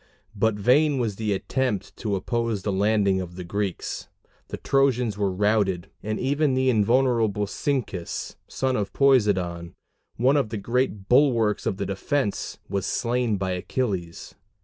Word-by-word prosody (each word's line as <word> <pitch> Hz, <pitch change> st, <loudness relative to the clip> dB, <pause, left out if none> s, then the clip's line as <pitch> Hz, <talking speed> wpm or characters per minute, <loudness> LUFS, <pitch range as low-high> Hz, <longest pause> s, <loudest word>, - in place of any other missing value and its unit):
But 110 Hz, +1 st, +2 dB
vain 135 Hz, +8 st, +3 dB
was 110 Hz, -6 st, -1 dB
the 110 Hz, -2 st, -1 dB
attempt 120 Hz, +2 st, -2 dB
to 105 Hz, -3 st, -2 dB
oppose 115 Hz, 0 st, -2 dB
the 105 Hz, -, -1 dB
landing 100 Hz, -1 st, +2 dB
of 90 Hz, -1 st, -8 dB
the 90 Hz, -, -6 dB
Greeks: 100 Hz, +1 st, -3 dB, 0.4 s
the -, -, -6 dB
Trojans 125 Hz, -5 st, +1 dB
were 100 Hz, -2 st, 0 dB
routed, 100 Hz, -2 st, 0 dB
and 110 Hz, +1 st, -3 dB
even 140 Hz, +1 st, +1 dB
the 130 Hz, 0 st, +3 dB
invulnerable 115 Hz, -2 st, +2 dB
Cyncus, 100 Hz, -6 st, -3 dB
son 130 Hz, -1 st, -1 dB
of 100 Hz, -3 st, -2 dB
Poseidon, 95 Hz, -11 st, +2 dB, 0.4 s
one 130 Hz, +5 st, +3 dB
of 135 Hz, -6 st, 0 dB
the 110 Hz, -, -4 dB
great 105 Hz, -2 st, -1 dB
bulwarks 120 Hz, -5 st, +3 dB
of 100 Hz, -, -1 dB
the 100 Hz, -, -2 dB
defense, 100 Hz, +5 st, -2 dB
was 100 Hz, -2 st, -2 dB
slain 120 Hz, -3 st, 0 dB
by 95 Hz, -1 st, -2 dB
Achilles. 90 Hz, -2 st, -3 dB
105 Hz, 150 wpm, -25 LUFS, 100-125 Hz, 0.4 s, vain